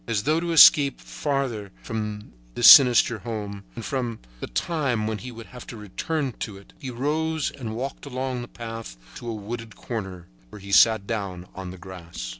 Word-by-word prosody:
As 105 Hz, -3 st, -1 dB
though 155 Hz, +3 st, +2 dB
to 170 Hz, 0 st, -3 dB
escape 145 Hz, -3 st, +7 dB
farther 130 Hz, -9 st, -3 dB
from 105 Hz, -2 st, -5 dB, 0.2 s
this -, -, +5 dB
sinister 120 Hz, -4 st, +8 dB
home, 105 Hz, -4 st, -6 dB
and 115 Hz, -, -7 dB
from 120 Hz, -4 st, -2 dB, 0.2 s
the -, -, -5 dB
time 130 Hz, -, -1 dB
when 110 Hz, -1 st, -2 dB
he 125 Hz, -, -8 dB
would 115 Hz, -1 st, -10 dB
have 125 Hz, -1 st, -12 dB
to 115 Hz, -, -8 dB
return 135 Hz, -, -3 dB
to 105 Hz, -3 st, -5 dB
it, 100 Hz, -, -17 dB
he 135 Hz, -5 st, -6 dB
arose 155 Hz, +5 st, -1 dB
and 115 Hz, -5 st, -6 dB
walked 135 Hz, +4 st, -5 dB
along 130 Hz, -2 st, -3 dB
a -, -, -8 dB
path 115 Hz, -, -8 dB, 0.2 s
to 120 Hz, -, -7 dB
a 115 Hz, -, -3 dB
wooded 110 Hz, +1 st, -7 dB
corner, 95 Hz, -7 st, -6 dB, 0.2 s
where 105 Hz, -, -11 dB
he 100 Hz, 0 st, -10 dB
sat 110 Hz, +2 st, +5 dB
down 100 Hz, -5 st, -4 dB
on 95 Hz, -1 st, -7 dB
the 95 Hz, -, -9 dB
grass. 85 Hz, -9 st, -8 dB
115 Hz, 190 wpm, -25 LUFS, 100-130 Hz, 0.2 s, sinister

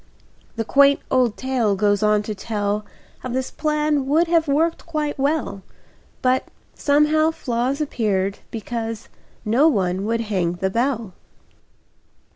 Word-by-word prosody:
The 225 Hz, -1 st, -2 dB
quaint 280 Hz, +3 st, +5 dB
old 250 Hz, -4 st, +2 dB
tale 250 Hz, -6 st, 0 dB
goes 205 Hz, +1 st, +2 dB
on 210 Hz, -1 st, +3 dB
to 215 Hz, -, -4 dB
tell 210 Hz, 0 st, -2 dB, 0.4 s
How 255 Hz, -, -6 dB
this 255 Hz, +1 st, -2 dB
plan 300 Hz, -2 st, 0 dB
would 315 Hz, +5 st, +3 dB
have 330 Hz, -1 st, +2 dB
worked 320 Hz, +5 st, 0 dB
quite 305 Hz, -3 st, -2 dB
well, 280 Hz, -7 st, 0 dB
[Pg -, -, -12 dB
34] -, -, -23 dB, 0.6 s
But, 255 Hz, 0 st, +2 dB, 0.3 s
somehow, 300 Hz, +2 st, +3 dB
flaws 260 Hz, -1 st, -2 dB
Appeared, 200 Hz, -8 st, -1 dB
because 225 Hz, 0 st, -5 dB, 0.4 s
No 240 Hz, +9 st, +4 dB
one 190 Hz, -, +1 dB
would 230 Hz, +1 st, 0 dB
hang 190 Hz, -6 st, -1 dB
the 190 Hz, +2 st, -2 dB
bell. 230 Hz, -3 st, -1 dB
240 Hz, 140 wpm, -22 LUFS, 210-290 Hz, 0.6 s, quaint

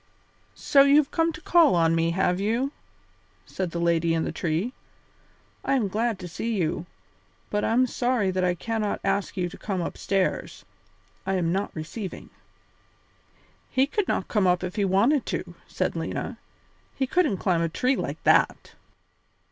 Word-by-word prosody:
"So 280 Hz, -, +4 dB
you 280 Hz, +1 st, +6 dB
have 295 Hz, -2 st, +4 dB
come 330 Hz, 0 st, +2 dB
to 350 Hz, -, -10 dB
call 330 Hz, -, +5 dB
on 165 Hz, -1 st, +3 dB
me, 165 Hz, 0 st, +2 dB
have 180 Hz, +1 st, +1 dB
you?" 230 Hz, +7 st, 0 dB, 0.7 s
said 185 Hz, -2 st, -3 dB
the 170 Hz, -, -5 dB
lady 170 Hz, -1 st, +2 dB
in 160 Hz, -, 0 dB
the -, -, -2 dB
tree. 175 Hz, +8 st, -2 dB, 0.9 s
"I -, -, +1 dB
am 225 Hz, -7 st, +1 dB
glad 225 Hz, +2 st, 0 dB
to 180 Hz, -1 st, -7 dB
see 225 Hz, +6 st, -3 dB
you, 170 Hz, -2 st, -1 dB, 0.6 s
but 210 Hz, 0 st, 0 dB
I'm 245 Hz, +3 st, +3 dB
sorry 245 Hz, -5 st, 0 dB
that 185 Hz, 0 st, -1 dB
I 180 Hz, -1 st, +2 dB
cannot 220 Hz, +2 st, -2 dB
ask 200 Hz, +1 st, -1 dB
you 180 Hz, -1 st, 0 dB
to 175 Hz, -, -11 dB
come 195 Hz, -3 st, -3 dB
upstairs. 190 Hz, +2 st, -2 dB, 0.6 s
I 190 Hz, 0 st, -1 dB
am 170 Hz, -3 st, 0 dB
not 195 Hz, +3 st, -1 dB
receiving." 175 Hz, +5 st, -7 dB, 1.4 s
"He 265 Hz, 0 st, +3 dB
could 395 Hz, +7 st, -1 dB
not -, -, -1 dB
come 205 Hz, -4 st, +2 dB
up 180 Hz, 0 st, +2 dB
if 180 Hz, +1 st, -4 dB
he 205 Hz, -2 st, +1 dB
wanted 230 Hz, +9 st, +3 dB
to," -, -, -4 dB
said -, -, -2 dB
Lena; -, -, -4 dB, 0.6 s
"he 270 Hz, -, 0 dB
couldn't 295 Hz, -, +1 dB
climb 175 Hz, -3 st, +1 dB
a 165 Hz, -, 0 dB
tree 255 Hz, +10 st, +1 dB
like -, -, -4 dB
that." -, -, +3 dB
195 Hz, 170 wpm, -26 LUFS, 175-250 Hz, 1.4 s, you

